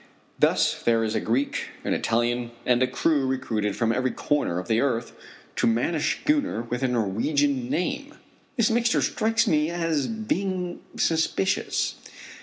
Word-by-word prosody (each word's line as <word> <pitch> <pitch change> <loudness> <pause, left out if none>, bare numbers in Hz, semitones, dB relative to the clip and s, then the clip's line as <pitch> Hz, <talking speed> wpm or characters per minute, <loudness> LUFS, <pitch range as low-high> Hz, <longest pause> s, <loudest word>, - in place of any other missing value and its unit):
Thus - - +2
there 115 -1 +2
is 110 -1 -1
a - - +1
Greek, 130 +5 -1 0.2
an - - 0
Italian, 120 +1 0 0.2
and 125 0 +3
a 130 - +4
crew 140 +1 +1
recruited 115 -6 -1
from 115 -1 +1
every 130 +2 +1
corner 145 - -1
of 90 -1 -4
the 110 +1 +2
earth 120 -4 0 0.5
to - - +2
man 115 +8 +1
a 160 - 0
schooner 285 - 0
with 120 +2 -4
a 130 - +2
Norwegian 125 +4 0
name! 280 - -2 0.4
This 230 -2 +3
mixture 235 +1 +2
strikes 225 +1 +1
me 150 0 +2
as 165 -4 0
being 190 -5 -2 0.2
suspicious. 160 - 0
135 Hz, 155 wpm, -25 LUFS, 115-175 Hz, 0.5 s, a